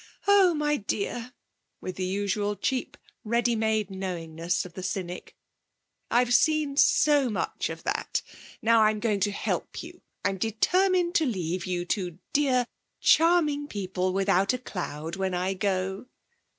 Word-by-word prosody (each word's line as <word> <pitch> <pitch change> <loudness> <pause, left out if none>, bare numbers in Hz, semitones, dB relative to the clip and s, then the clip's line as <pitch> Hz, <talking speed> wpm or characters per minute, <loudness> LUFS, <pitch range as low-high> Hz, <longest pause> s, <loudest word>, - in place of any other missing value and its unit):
'Oh, 390 -4 +6
my 295 0 +1
dear' 230 +4 -3 0.5
(with 185 - -6
the 185 - -1
usual 205 +2 -1
cheap, 255 +4 -2 0.3
ready 235 +1 +1
made 220 -2 0
knowingness 175 -3 -3
of 180 - -11
the 185 - -7
cynic), 180 -1 -5 0.7
'I've 245 0 +3
seen 305 0 +3
so 290 -2 +4
much 215 - -2
of - - -7
that. - - -2 0.4
Now 230 0 +5
I'm 215 0 +3
going 210 -3 0
to 205 +2 +1
help 200 - -3
you. - - -12 0.2
I'm 195 -1 0
determined 350 - +2
to 320 -4 +2
leave 180 -5 -2
you 175 -1 -2
two 180 -3 -2 0.2
dear, 260 -4 +3 0.3
charming 315 -4 +3
people 185 -4 -2
without 195 +2 +2
a - - 0
cloud, 170 -8 -5
when 190 -1 -1
I 185 +2 0
go.' 190 +2 -2
205 Hz, 145 wpm, -27 LUFS, 185-255 Hz, 0.7 s, Oh